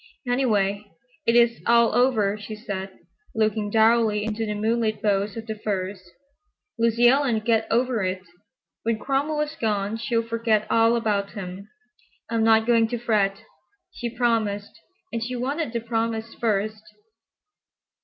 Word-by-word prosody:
"Anyway, 210 -6 +1 0.4
it 230 - +4
is 235 -1 +4
all 235 0 +4
over," 220 -5 +2
she 215 +1 -8
said, 195 -3 -5 0.5
looking 215 -1 0
dourly 220 -1 +3
into 220 +1 -2
the 210 - -2
moonlit 220 0 0
boughs 205 0 0
of 225 - -6
the 220 - -4
firs; 200 -3 -3 0.8
"Lucy 230 +1 +4
Ellen'll 260 -3 +3
get 225 0 +1
over 240 0 +1
it. 185 0 -2 0.6
When 230 -1 0
Cromwell 285 +5 -1
is 300 0 -3
gone 210 -1 -1
she'll 230 0 0
forget 230 -2 +1
all 230 +1 +4
about 205 -4 -1
him. 195 0 -7 0.6
I'm 225 -1 +1
not 220 0 +4
going 230 -1 +4
to 240 +1 -3
fret. 210 -3 0 0.5
She 240 - -5
promised, 225 -4 -1 0.4
and 230 -1 -2
she 250 +2 -4
wanted 270 +3 -2
the 235 -1 -2
promise 225 -1 -2
first." 215 -1 -1
225 Hz, 145 wpm, -24 LUFS, 210-235 Hz, 0.8 s, it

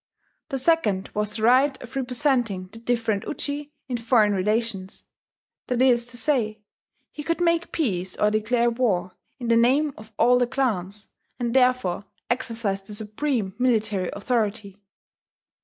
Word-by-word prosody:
The 270 - -2
second 250 - +1
was 210 0 -1
the 215 - -3
right 265 +4 +4
of 250 +2 -11
representing 245 -7 0
the 225 - -10
different 230 -3 0
Uji 290 0 -4 0.2
in 250 -2 -2
foreign 230 -3 +3
relations: 200 0 -2 0.6
that 250 -1 -1
is 245 -2 +4
to 240 0 -1
say, 235 -6 +1 0.5
he 300 - -7
could 335 +3 -1
make 340 -1 +1
peace 185 - -1
or 210 - +3
declare 235 +3 +1
war 220 -7 0 0.3
in 245 -3 -5
the 230 - +5
name 275 +5 +3
of 215 +1 -13
all 245 +1 +5
the 245 - +2
clans, 210 -6 -2 0.3
and 240 -2 -2
therefore 250 -8 +2 0.3
exercised 225 -5 -2
the 210 - -6
supreme 215 -1 -2
military 215 -7 +1
authority. 210 -3 -2
235 Hz, 145 wpm, -24 LUFS, 210-255 Hz, 0.6 s, the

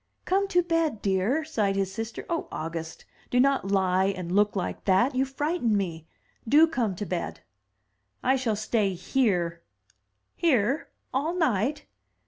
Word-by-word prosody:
" - - -46
"Come 395 +2 +2
to 355 -3 +2
bed, 330 -9 0
dear," 205 +11 +1
sighed 210 -11 0
his 195 -1 -1
sister. 225 +2 -5
"Oh, 335 -1 -2
August, 165 0 -5 0.2
do 245 - +2
not 270 -6 +2
lie 190 -1 +2
and 185 -3 -2
look 205 +2 +3
like 185 - -3
that! 195 +8 +3
you 260 +1 +1
frighten 270 -4 0
me. 165 -5 -3 0.4
Do 300 +5 +7
come 245 - -1
to 205 - -4
bed." 180 -3 -4 0.8
"I 260 +1 +3
shall 245 -5 0
stay 210 -2 0
here." 180 -5 0 0.7
"Here! 270 - +1 0.2
all 300 +7 0
night!" 280 - 0
220 Hz, 150 wpm, -27 LUFS, 190-280 Hz, 0.8 s, Do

